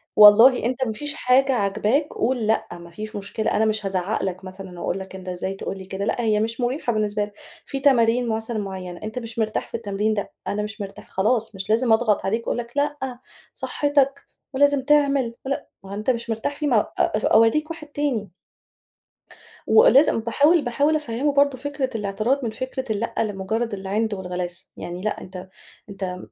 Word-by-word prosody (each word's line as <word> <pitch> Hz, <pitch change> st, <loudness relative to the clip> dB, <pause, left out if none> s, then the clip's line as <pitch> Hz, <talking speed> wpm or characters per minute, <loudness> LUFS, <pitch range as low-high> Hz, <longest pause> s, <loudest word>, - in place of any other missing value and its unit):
والله 220 Hz, +4 st, +8 dB
أنت 255 Hz, +2 st, 0 dB
ما 225 Hz, -, -2 dB
فيش 290 Hz, +6 st, -4 dB
حاجة 265 Hz, +2 st, +3 dB
عاجباك 220 Hz, +6 st, +1 dB
قُل 240 Hz, -2 st, 0 dB
لأ، 220 Hz, -, +1 dB
ما 170 Hz, 0 st, -9 dB
فيش 215 Hz, +5 st, -8 dB
مشكلة، 205 Hz, +2 st, -2 dB
أنا 220 Hz, -, +2 dB
مش 215 Hz, -1 st, 0 dB
هازَعّق 190 Hz, +2 st, -1 dB
لك 185 Hz, -1 st, -3 dB
مثلًا، 185 Hz, -1 st, -9 dB
وأقول 185 Hz, -, -2 dB
لك: 190 Hz, 0 st, -9 dB
"أنت 185 Hz, -1 st, -7 dB
إزاي 180 Hz, +1 st, -3 dB
تقول 195 Hz, 0 st, -5 dB
لي 190 Hz, -, -9 dB
كده؟" 195 Hz, +1 st, -4 dB
لأ، 240 Hz, -, 0 dB
هي 215 Hz, -2 st, +2 dB
مش 230 Hz, +3 st, -2 dB
مُريحة 245 Hz, 0 st, 0 dB
بالنسبة 210 Hz, -1 st, 0 dB
لك، 205 Hz, -, -15 dB, 0.3 s
في 275 Hz, -, -4 dB
تمارين 245 Hz, -3 st, +3 dB
مثلًا 225 Hz, +1 st, -2 dB
مُعينة، 185 Hz, -3 st, -6 dB
أنت 215 Hz, +3 st, -4 dB
مش 230 Hz, -1 st, -7 dB
مرتاح 220 Hz, -1 st, -1 dB
في -, -, -7 dB
التمرين 210 Hz, 0 st, -1 dB
ده، 205 Hz, -, -3 dB, 0.2 s
"أنا 210 Hz, +1 st, -1 dB
مش 210 Hz, 0 st, -6 dB
مرتاح." 195 Hz, 0 st, -8 dB
خلاص 220 Hz, +2 st, 0 dB
مش 190 Hz, +1 st, -6 dB
لازم 225 Hz, +1 st, +3 dB
أضغط 220 Hz, -2 st, +2 dB
عليك 225 Hz, +4 st, -1 dB
وأقول -, -, 0 dB
لك: 235 Hz, -1 st, -5 dB
"لأ، 285 Hz, -4 st, -1 dB, 0.3 s
صحتك، 280 Hz, -1 st, +1 dB, 0.3 s
ولازم 285 Hz, 0 st, +3 dB
تعمل، 280 Hz, -4 st, +2 dB
ول" 270 Hz, -, -3 dB, 0.3 s
ما 195 Hz, -, -11 dB
هو -, -, -5 dB
أنت 210 Hz, +4 st, -3 dB
مش 235 Hz, -1 st, -1 dB
مرتاح 225 Hz, +5 st, -2 dB
فيه 295 Hz, 0 st, -2 dB
م 270 Hz, -, +2 dB
أ 215 Hz, -, +4 dB, 0.4 s
أورِّيك 230 Hz, +8 st, +4 dB
واحد 330 Hz, -2 st, -7 dB
تاني. 280 Hz, -9 st, -2 dB, 1.4 s
وأ 465 Hz, +3 st, +7 dB
لازم 275 Hz, -4 st, +5 dB
باحاول 290 Hz, +9 st, +3 dB
باحاول 285 Hz, +5 st, +2 dB
أفَهِّمه 285 Hz, 0 st, -1 dB
برضه 280 Hz, -2 st, +3 dB
فكرة 280 Hz, 0 st, -3 dB
الاعتراض 220 Hz, +6 st, -1 dB
من 230 Hz, -, -1 dB
فكرة 260 Hz, +3 st, -4 dB
اللأ 215 Hz, +2 st, -3 dB
لمجرد 215 Hz, +2 st, -1 dB
العِند 205 Hz, +3 st, -1 dB
والغلاسة، 180 Hz, -2 st, -5 dB
يعني 175 Hz, +1 st, -6 dB
لأ 215 Hz, -, -2 dB
أنت 185 Hz, 0 st, -9 dB, 0.4 s
أنت 190 Hz, -2 st, -5 dB
225 Hz, 190 wpm, -23 LUFS, 200-260 Hz, 1.4 s, والله